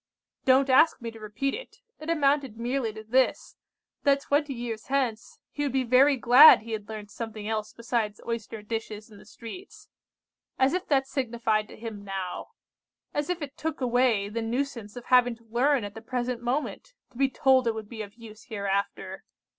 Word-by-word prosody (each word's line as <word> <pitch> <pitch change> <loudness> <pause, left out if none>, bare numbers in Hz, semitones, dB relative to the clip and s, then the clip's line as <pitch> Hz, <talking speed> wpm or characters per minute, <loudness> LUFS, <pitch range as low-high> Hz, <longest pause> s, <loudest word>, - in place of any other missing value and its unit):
"Don't 265 +1 +5
ask 315 +5 +5
me 235 -2 -6
to 225 - -13
repeat 215 +6 -3
it. - - -8 0.2
It 310 - -7
amounted 280 -6 +1
merely 240 0 -1
to 215 0 -10
this, 255 +4 +1 0.5
that 280 -1 +3
twenty 290 +1 0
years 235 -3 -5
hence 255 -5 -1
he 290 - -5
would 280 -3 -1
he 265 - +2
very 260 +3 +5
glad 245 +4 +9
he 230 - -9
had 215 -2 -5
learnt 210 -1 -7
something 220 -2 -6
else 215 -1 -2
besides 230 -3 -2
making - - -6
oyster 225 -1 -5
dishes 220 0 -5
in 205 - -14
the - - -16
streets. 245 - -11 0.7
As 265 +1 +3
if 365 - -2
that 270 -2 +2
signified 230 -5 -1
to - - -13
him 215 -2 -7
now! 195 -2 -5 0.7
As 290 +2 -2
if 355 -3 -2
it 280 -1 -7
took 320 0 -4
away 245 -5 +2
the 225 +3 -4
nuisance 235 -2 -3
of 245 - -8
having 245 -1 +4
to 230 - -24
learn 245 +3 +1
at 205 0 -6
the 225 - -9
present 245 0 -3
moment, 270 - -3 0.2
to - - -16
be 275 -1 +3
told 260 -1 +3
it 225 - +1
would 220 -1 -6
be 220 0 -7
of 205 0 -9
use 225 -2 -13
hereafter! 200 -3 -3
235 Hz, 195 wpm, -27 LUFS, 220-270 Hz, 0.7 s, glad